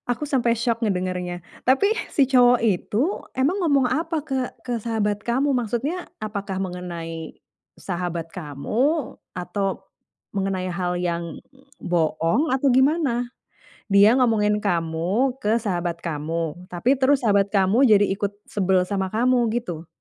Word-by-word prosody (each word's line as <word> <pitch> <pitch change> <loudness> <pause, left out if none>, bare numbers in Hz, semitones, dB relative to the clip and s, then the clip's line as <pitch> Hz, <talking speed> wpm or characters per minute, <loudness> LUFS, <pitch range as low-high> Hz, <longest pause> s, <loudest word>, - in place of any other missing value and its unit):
aku 245 +5 -1
sampai 240 -5 +1
syok 230 0 0
ngedengernya. 180 -3 -2 0.2
Tapi 335 +12 +4 0.2
si 280 - +3
cowok 245 -2 +5
itu 210 +4 +1 0.3
emang 295 +10 +1
ngomong 280 -6 +3
apa 325 -1 -1
ke 265 -3 -2 0.2
ke 240 -2 -2
sahabat 210 -2 -1
kamu? 265 +5 +1
Maksudnya 250 - -2
apakah 200 -3 -4
mengenai 170 -3 -6 0.4
sahabat 175 -2 -4
kamu, 215 - -1 0.2
atau 195 +1 -3 0.5
mengenai 195 -2 -1
hal 180 0 -2
yang 170 -2 -3 0.4
bohong, 170 - +1
atau 270 +1 +2
gimana? 265 -2 +2 0.6
Dia 200 +4 +6
ngomongin 210 -4 +2
kamu 185 +7 0
ke 215 -2 +1
sahabat 175 -7 -2
kamu, 165 +2 -3
tapi 235 +10 +2
terus 270 0 +3
sahabat 200 -3 +3
kamu 200 +5 +3
jadi 205 -2 +6
ikut 200 +1 -1 0.2
sebel 190 -2 +2
sama 190 -1 -1
kamu, 245 +2 +2
gitu? 175 -9 -4
210 Hz, 130 wpm, -23 LUFS, 180-250 Hz, 0.6 s, Dia